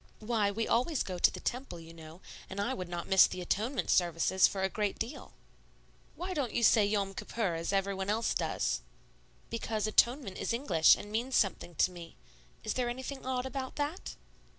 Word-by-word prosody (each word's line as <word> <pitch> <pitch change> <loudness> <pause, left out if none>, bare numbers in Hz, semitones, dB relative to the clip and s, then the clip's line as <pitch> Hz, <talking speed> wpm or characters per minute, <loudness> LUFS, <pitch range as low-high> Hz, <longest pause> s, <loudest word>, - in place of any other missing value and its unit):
"Why, 215 -2 0
we 225 +3 -2
always 255 +5 +1
go 180 -2 -5
to - - +6
the - - -8
Temple, 250 -8 -4
you 165 0 -12
know; 160 +2 -12 0.3
and 190 - -6
I 235 +6 0
would 185 -7 -5
not 175 -1 -5
miss 190 -1 +7
the - - -6
Atonement 215 +9 -1
services 175 +1 +3
for 195 -2 -3
a - - +3
great 205 +1 -2
deal." 235 +6 -6 0.8
"Why 365 +2 -4
don't 280 -8 -2
you 235 - +1
say 220 -1 +6
'Yom 200 -2 0
Kippur,' 200 -3 -2
as 165 +2 -2
everybody 195 0 -1
else 225 +2 +1
does?" - - -1 0.7
"Because 225 -2 -2
'Atonement' 235 0 +2
is - - -1
English 190 - +5
and 205 - -9
means 240 +4 -1
something 185 -4 0
to 180 - +3
me. 170 -2 -10 0.5
Is 215 - -1
there 250 -1 -1
anything 260 +2 -6
odd 255 -1 -1
about 265 0 -5
that?" 295 +5 -4
210 Hz, 190 wpm, -31 LUFS, 185-245 Hz, 0.8 s, miss